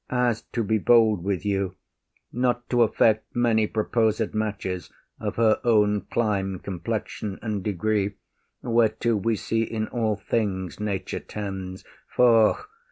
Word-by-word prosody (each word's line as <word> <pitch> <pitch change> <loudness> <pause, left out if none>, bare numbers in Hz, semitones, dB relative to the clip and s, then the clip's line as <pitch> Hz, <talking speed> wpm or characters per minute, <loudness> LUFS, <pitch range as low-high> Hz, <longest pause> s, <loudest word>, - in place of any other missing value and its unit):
As, 125 -3 +1
to 115 - 0
be 110 +1 +1
bold 110 -4 +4
with 95 0 -2
you, 100 -2 -1 0.6
Not 120 0 0
to 120 -1 +3
affect 110 -1 +2
many 115 -3 +2
proposed 110 0 0
matches, 100 -5 -3 0.3
Of - - -3
her 110 -2 +3
own 105 -3 +2
clime, 100 -5 0
complexion, 100 +2 -4
and 105 -4 -2
degree, 105 +1 0 0.5
Whereto 115 -1 +2
we 110 +2 0
see 115 +2 -1
in 110 -1 -2
all 110 -3 0
things 95 -3 -2
nature 100 -3 -3
tends; 95 -3 -6 0.2
Foh! 115 - +4
110 Hz, 130 wpm, -25 LUFS, 100-115 Hz, 0.6 s, bold